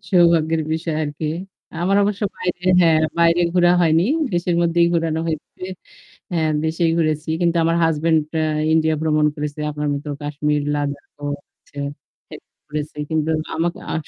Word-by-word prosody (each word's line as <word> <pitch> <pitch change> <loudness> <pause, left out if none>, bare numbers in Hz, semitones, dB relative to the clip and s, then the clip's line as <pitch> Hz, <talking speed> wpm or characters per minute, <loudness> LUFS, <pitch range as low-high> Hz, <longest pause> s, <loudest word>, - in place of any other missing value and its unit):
সৌভাগ্যের 165 -3 +4
বিষয় 160 0 -2
আরকি। 150 +1 -3 0.5
আমার 195 +3 +2
অবশ্য 200 0 -1 0.2
বাইরে 180 0 -3 0.2
হ্যাঁ 165 -2 +5 0.2
বাইরে 170 +1 +4
ঘোরা 175 -1 +5
হয়নি। 165 0 +4 0.3
দেশের 175 0 0
মধ্যেই 170 0 +3
ঘুরানো 165 -1 0
হয়েছে। 160 +2 -5 0.7
হ্যাঁ, 160 -2 +1
দেশেই 165 +1 +1
ঘুরেছি। 155 -1 0
কিন্তু 170 -1 +2
আমার 165 +1 +2
হাসব্যান্ড 160 0 +2 0.2
আ - - +2 0.3
'ইন্ডিয়া' 160 0 +2
ভ্রমণ 155 -1 +2
করেছে। 150 0 -5
আপনার 150 0 -3
মতো 145 +1 -5
'কাশ্মীর' 150 0 -1
'লাদাখ' 145 -1 -3 0.2
ও - - -2 0.3
হচ্ছে 145 - -16 0.5
এহ - - -7 0.3
ঘুরেছে 150 0 -5
কিন্তু 160 0 0 0.2
আমাক 170 +1 0 0.2
আ - - -1
160 Hz, 150 wpm, -21 LUFS, 150-170 Hz, 0.7 s, হ্যাঁ